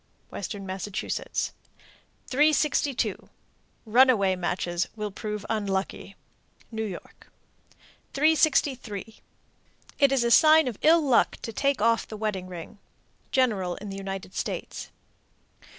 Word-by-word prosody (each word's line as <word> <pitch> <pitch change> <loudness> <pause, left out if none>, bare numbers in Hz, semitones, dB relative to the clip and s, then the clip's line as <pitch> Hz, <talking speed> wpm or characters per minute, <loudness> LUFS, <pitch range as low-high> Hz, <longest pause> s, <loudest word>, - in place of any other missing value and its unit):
Western 200 0 -6
Massachusetts. 190 +1 -3 0.7
362. 290 -1 +1 0.6
Runaway 220 -5 +4
matches 175 0 -2
will 210 -1 -4
prove 210 +1 -5
unlucky. 195 -2 -3 0.6
New 220 -1 -3
York. 195 -5 -9 0.8
363. 270 - +1 0.8
It 280 -2 +5
is 270 -3 +2
a 235 - +1
sign 315 +2 +7
of 235 -5 -4
ill 330 +2 +6
luck 265 -5 +3
to 225 - -5
take 275 -3 0
off 230 0 +2
the 215 - -8
wedding 205 -4 -3
ring. 180 +3 -9 0.5
_General 205 -9 +1
in 210 - -8
the - - -6
United 195 -1 -6
States. - - -5
215 Hz, 110 wpm, -26 LUFS, 195-265 Hz, 0.8 s, sign